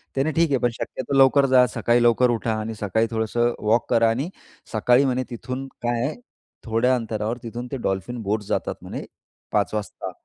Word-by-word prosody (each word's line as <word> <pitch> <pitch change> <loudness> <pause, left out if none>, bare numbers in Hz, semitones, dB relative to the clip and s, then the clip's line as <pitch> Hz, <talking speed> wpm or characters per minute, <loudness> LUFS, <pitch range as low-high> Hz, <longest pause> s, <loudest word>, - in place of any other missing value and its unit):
त्याने, 140 +4 +1
ठीक 165 0 +2
आहे. 135 - +3
पण 120 - +2
शक्यतो 130 +3 -5
लवकर 135 +1 +6
जा. 130 -1 +5
सकाळी 120 +1 +1
लवकर 120 +1 +4
उठा 115 -1 -1
आणि 110 +1 -4
सकाळी 110 +2 0
थोडंसं 120 +2 0
वॉक 115 +2 +2
करा 115 -1 +4
आणि 135 +9 -1 0.4
सकाळी 125 +5 +4
म्हणे 130 0 0
तिथून 130 +3 -5
काय 120 -1 0
आहे, 155 - -2 0.5
थोड्या 115 +3 +2
अंतरावर 110 0 -2
तिथून 120 +2 -6
ते 135 - -2
डॉल्फिन 105 +2 -3
बोट्स 105 +1 -1
जातात - - -1
म्हणे - - -6 0.5
5 105 -1 +1
वाजता, 105 -1 -4
120 Hz, 180 wpm, -23 LUFS, 110-130 Hz, 0.5 s, लवकर